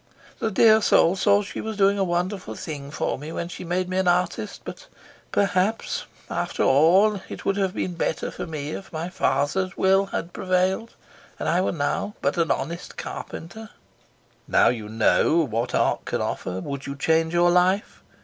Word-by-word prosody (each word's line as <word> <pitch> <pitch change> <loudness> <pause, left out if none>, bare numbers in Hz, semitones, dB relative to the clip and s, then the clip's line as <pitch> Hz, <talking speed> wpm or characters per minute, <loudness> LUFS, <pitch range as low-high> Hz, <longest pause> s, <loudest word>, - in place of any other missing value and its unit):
"The 225 - 0
dear 220 +2 +5
soul 175 -3 +4
thought 205 +1 +3
she - - -6
was 220 -1 -5
doing 200 0 +3
a - - +3
wonderful 185 +2 -2
thing 145 -4 -6
for 145 - -2
me 150 +3 -7
when 170 +1 -4
she - - -7
made 180 +1 -1
me 185 +1 -1
an 190 - +1
artist, 180 +3 0
but - - -9 0.4
perhaps, 195 +2 0 0.2
after - - -2
all, 185 +9 +4
it - - -8
would 195 - +1
have 195 -1 0
been 180 - -2
better 165 -2 -2
for - - -6
me 150 -2 -5
if 190 - -7
my 165 +1 -4
father's 160 +4 0
will 195 +1 +3
had 175 -3 -4
prevailed 185 +4 0 0.4
and - - -4
I 175 +2 +2
were - - 0
now 165 +6 -2
but - - 0
an 165 - +2
honest 170 +6 -3
carpenter." 220 +7 -7 0.8
"Now - - +4
that - - 0
you 105 -1 -8
know 135 +8 +3
what 120 0 -2
art - - +1
can - - -2
offer, 90 0 -3
would 140 +2 -6
you 140 - -4
change 160 +3 +1
your 175 0 +4
life? 185 +4 +1
180 Hz, 185 wpm, -24 LUFS, 160-195 Hz, 0.8 s, dear